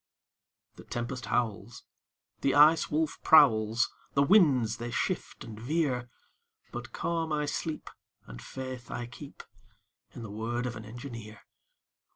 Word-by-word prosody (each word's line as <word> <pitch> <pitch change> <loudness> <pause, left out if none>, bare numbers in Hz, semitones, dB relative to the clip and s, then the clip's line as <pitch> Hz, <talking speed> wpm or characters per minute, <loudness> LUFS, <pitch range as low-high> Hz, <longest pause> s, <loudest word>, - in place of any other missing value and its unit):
The - - -11
tempest 120 -1 -5
howls, 115 -1 -2 0.6
The 135 - +1
Ice 155 +2 +6
Wolf 155 0 -1
prowls, 115 -7 +5 0.2
The 140 - +5
winds 140 - +4
they 120 +1 -5
shift - - -3
and 110 -1 -9
veer, 125 -2 -1 0.6
But 120 0 -7
calm 165 +2 -2
I 150 -1 0
sleep, 155 +2 -4 0.4
And - - -10
faith 130 -2 -7
I 120 - -4
keep 130 +4 -11 0.7
In 120 - -7
the 105 - -7
word 115 +3 -3
of 120 -2 -3
an 110 -1 -8
engineer. 115 -2 -9
120 Hz, 135 wpm, -29 LUFS, 115-145 Hz, 0.7 s, Ice